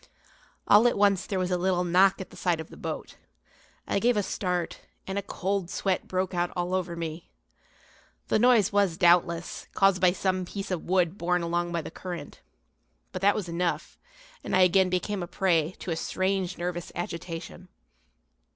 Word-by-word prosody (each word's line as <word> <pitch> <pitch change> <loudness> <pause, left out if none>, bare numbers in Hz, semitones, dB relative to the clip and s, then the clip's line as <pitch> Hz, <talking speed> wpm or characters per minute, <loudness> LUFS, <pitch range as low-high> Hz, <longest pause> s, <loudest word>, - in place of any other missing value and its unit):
All 210 +4 +7
at 240 - +1
once 200 -2 +3
there 195 - -2
was 185 0 -1
a 180 - +1
little 180 0 +1
knock 185 +2 +4
at 190 - -8
the - - -13
side 175 -3 0
of 160 - -8
the - - -10
boat. - - -6 0.7
I - - +1
gave 240 +1 +2
a 205 - +2
start, 180 -3 -2 0.3
and 190 - -4
a 200 - 0
cold 195 -1 -2
sweat 190 -1 -1
broke 185 0 -1
out 175 0 0
all 180 0 -2
over 180 -2 -1
me. 165 0 -6 1.0
The - - +2
noise 225 -4 +4
was, 200 -5 +2
doubtless, 175 -1 +2
caused 195 -2 +3
by 180 -1 +6
some 185 -1 0
piece 195 +2 -6
of 180 -3 -3
wood 180 0 +1
borne 180 0 +1
along 175 +1 -1
by 170 -2 -2
the - - -8
current, 175 -5 -8 0.7
but 185 - -5
that 200 +1 +4
was 200 -4 -3
enough, 170 +1 -2 0.4
and - - -1
I 185 - +5
again 185 +1 +5
became 185 +2 -1
a 175 - -4
prey 170 -2 +1
to 180 - -5
a - - 0
strange 185 +2 -1
nervous 175 0 -4
agitation. 175 +1 -6
180 Hz, 185 wpm, -27 LUFS, 175-195 Hz, 1.0 s, All